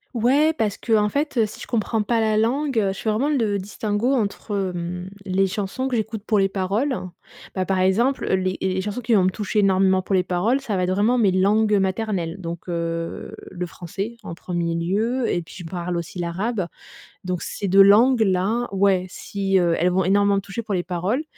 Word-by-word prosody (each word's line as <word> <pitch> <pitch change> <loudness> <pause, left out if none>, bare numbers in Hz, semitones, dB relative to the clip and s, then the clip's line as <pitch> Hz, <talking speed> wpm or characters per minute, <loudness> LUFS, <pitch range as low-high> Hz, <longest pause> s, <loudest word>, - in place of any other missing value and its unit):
Ouais, 275 +7 +3
parce 215 -9 -1
qu'en 215 -3 +2
fait, 280 -2 0
si 210 - -9
je - - -8
comprends 225 -1 0
pas 230 +2 0
la 220 -1 +2
langue, 250 +4 +1
heu, 200 -2 +1
je - - -11
fais 220 - -1
vraiment 245 +8 0
le 225 -9 +1
distinguo 205 +4 -1
entre, 200 -4 -2
mmh, 175 +1 -5 0.2
les 190 +1 +2
chansons 200 +6 -3
que 260 - -1
j'écoute 220 -2 -3
pour 215 -2 +2
les 195 0 +2
paroles. 200 +8 -1 0.6
Bah, 185 - -1
par 190 - +1
exemple, 220 +9 +2
les 185 0 0
les 190 0 -1
chansons 210 +5 -4
qui 230 0 0
vont 200 -4 +5
me - - +4
toucher 210 +2 -2
énormément 190 -1 +3
pour 190 +1 -1
les 185 - +3
paroles, 195 +9 0
ça 225 -7 -3
va 185 - 0
être - - -2
vraiment 210 +6 +2
mes 205 -4 +4
langues, 210 +3 +3
heu, - - +3
maternelles, 190 -3 -1
donc 170 0 -6
heu, 165 -1 -4 0.2
le 180 -1 -4
français 195 +7 -6
en 165 - -6
1er 170 -1 -3
lieu 215 +9 0
et 175 - -1
puis - - -14
je - - -7
parle 175 +1 -4
aussi 170 +1 -5
l'arabe, 185 +4 -2 0.6
donc 180 -1 -3
ces 200 - -4
2 195 +1 +7
langues-là, 220 0 +4
ouais, 195 -2 +2
si, 195 +1 -1
heu, 170 -2 +2
elles 180 +2 +2
vont 185 +1 +1
énormément 200 +2 +3
me - - +1
toucher 200 +4 -6
pour 210 -2 -3
les 175 -1 -1
paroles 185 - -1
195 Hz, 210 wpm, -22 LUFS, 185-220 Hz, 0.6 s, 2